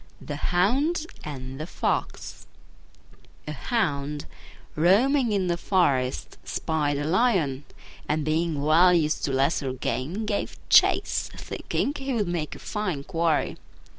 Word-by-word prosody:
THE 145 - -6
HOUND 270 - +2 0.2
AND 135 -2 -7
THE 155 - -5
FOX - - -3 1.0
A - - -3
Hound, 145 - -2 0.5
roaming 230 - +3
in 195 -2 +1
the 175 -1 0
forest, 140 -10 0
spied 150 -3 -1
a 145 - -2
lion, 165 - +1 0.4
and 150 -1 0
being 155 -1 0
well 165 +4 +6
used 155 -2 +1
to 140 - -2
lesser 135 0 +1
game, 150 - -3
gave 210 -1 -2
chase, - - +4
thinking 285 - -2
he 270 - 0
would 210 -4 0
make 170 -3 -3
a - - -9
fine 185 -10 -3
quarry. 165 -2 0
160 Hz, 130 wpm, -26 LUFS, 145-200 Hz, 1.0 s, well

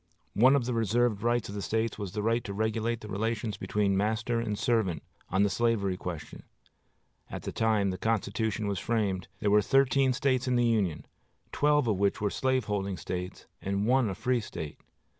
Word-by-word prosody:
One 130 +6 +6
of 130 -4 +1
the 125 - -1
reserved 115 -1 +1
rights 120 0 +1
of - - -6
the 100 - -4
States 110 +1 -1
was 100 -3 -5
the 105 0 -2
right 115 +2 +1
to 100 - -4
regulate 110 +2 -1
the 105 - -8
relations 110 +1 -2
between 100 0 0
master 110 +3 0
and 105 -3 -2
servant, 105 -11 0 0.3
on 95 +2 +2
the 100 - +3
slavery 105 -4 +1
question. 90 -4 -7 0.9
At - - -6
the - - -4
time 110 -3 +1
the 95 - -5
Constitution 110 -1 -1
was 100 -2 -1
framed 100 -5 -1
there 105 -2 +2
were 105 0 +6
thirteen 135 +3 +3
States 130 -1 +1
in 125 - +2
the 120 0 +3
Union, 100 -9 0 0.5
twelve 145 -3 +2
of 105 -4 +1
which 100 +1 +1
were 105 -1 0
slaveholding 105 -7 -1
States 90 +3 -5 0.2
and 100 +1 -1
one 125 -1 +3
a 95 - -3
free 125 +4 0
State. 80 -7 -7
110 Hz, 190 wpm, -29 LUFS, 100-120 Hz, 0.9 s, One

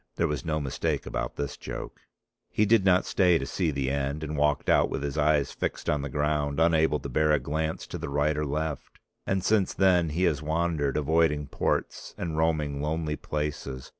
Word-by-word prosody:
There - - +1
was 75 - -3
no 80 -2 -1
mistake 70 -3 -2
about - - -3
this 70 -1 -3
joke. - - -7 0.5
He 105 - +2
did 110 -1 +4
not 95 -1 +4
stay 90 -3 +3
to 70 - -3
see 85 +3 -1
the 70 -2 -1
end, 70 +2 -2
and 75 0 -4
walked 75 0 +1
out - - +4
with - - -3
his 70 -1 -3
eyes 75 -2 +2
fixed - - -4
on 75 - 0
the 70 - -4
ground, 75 +1 0
unable 80 -2 +3
to - - -5
bear 75 +4 +2
a 75 - +5
glance 80 +4 -3
to - - -7
the - - -5
right 75 +2 +1
or 75 - -1
left. 75 0 -3 0.3
And 95 -1 0
since 105 -3 +2
then 90 -4 +3
he 85 +5 -1
has 75 -5 +2
wandered, 80 -2 0
avoiding 75 0 +2
ports - - -2
and 85 -3 -3
roaming 75 -3 0
lonely 75 0 -1
places. 75 -4 -4
75 Hz, 200 wpm, -27 LUFS, 70-80 Hz, 0.5 s, a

